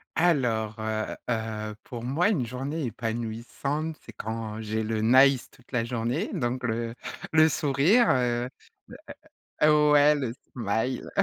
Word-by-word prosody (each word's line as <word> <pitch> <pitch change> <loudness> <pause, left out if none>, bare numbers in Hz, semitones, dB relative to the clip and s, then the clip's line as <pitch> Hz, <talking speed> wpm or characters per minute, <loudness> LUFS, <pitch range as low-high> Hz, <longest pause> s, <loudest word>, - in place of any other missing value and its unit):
Alors, 120 -10 +1
heu 110 0 -2
heu, 110 -2 -3
pour 120 -2 -8
moi 155 +11 +2
une 145 - +1
journée 135 +5 -4
épanouissante, 120 +7 -3
c'est 115 - -12
quand 110 0 -5
j'ai 110 +1 -2
le 110 0 -1
nice 130 +3 +5
toute 125 0 -23
la 120 -2 +1
journée, 120 0 -2
donc 125 -5 -2
le 115 0 -2 0.4
le 160 0 +6
sourire, 155 - +3
heu. 125 -1 +1 1.1
Heu, 150 0 +5
ouais! 150 +1 +6
Le 130 -5 -2 0.2
smile. 115 +2 -2
120 Hz, 135 wpm, -27 LUFS, 110-145 Hz, 1.1 s, le